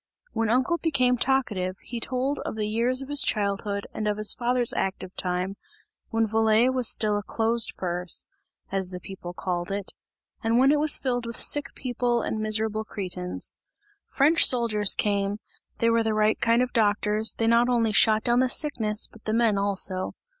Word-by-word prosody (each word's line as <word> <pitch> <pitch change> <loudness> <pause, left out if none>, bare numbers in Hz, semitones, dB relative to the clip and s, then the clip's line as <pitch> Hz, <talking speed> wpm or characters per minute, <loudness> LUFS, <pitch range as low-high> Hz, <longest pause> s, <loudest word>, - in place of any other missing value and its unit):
When 225 -1 -1
uncle 260 +8 +1
became 255 -6 +2
talkative, 225 -8 -1
he 240 0 -6
told 260 +4 -1
of - - -5
the 215 -1 -2
years 240 +5 0
of 270 - -11
his 290 -2 +5
childhood 200 -1 0
and 215 - -3
of 210 0 -1
his 215 -1 +3
father's 245 0 0
active 190 -1 -3
time, 185 +1 -2 0.5
when 225 -1 +1
Valais 220 +2 +3
was 255 -3 +3
still 210 -1 +1
a - - -5
closed 225 +3 0
purse, 180 -1 -1 0.5
as 190 -2 -2
the 180 -1 -7
people 180 -2 -9
called 175 -1 -3
it, 200 -1 -3 0.5
and 225 +1 +2
when 265 +3 +5
it 300 - +2
was 305 0 +5
filled 245 -3 -2
with 235 - -7
sick 290 -1 0
people 245 -2 -1
and 220 - -3
miserable 215 0 -1
cretins. 180 -4 -4 0.6
French 310 +5 +4
soldiers 220 -5 +2
came, 200 -1 -1 0.4
they 230 0 +2
were 230 0 +2
the 220 -1 -1
right 215 0 +1
kind 235 +1 +3
of 250 - -5
doctors, 210 -1 +2
they 225 - -1
not 235 +2 +3
only 230 -3 +1
shot 215 +2 +4
down 240 0 +2
the 255 0 +2
sickness 225 -8 +1
but 225 - -16
the 215 - -1
men 230 -2 +2
also. 195 -2 -1
220 Hz, 180 wpm, -25 LUFS, 205-245 Hz, 0.6 s, his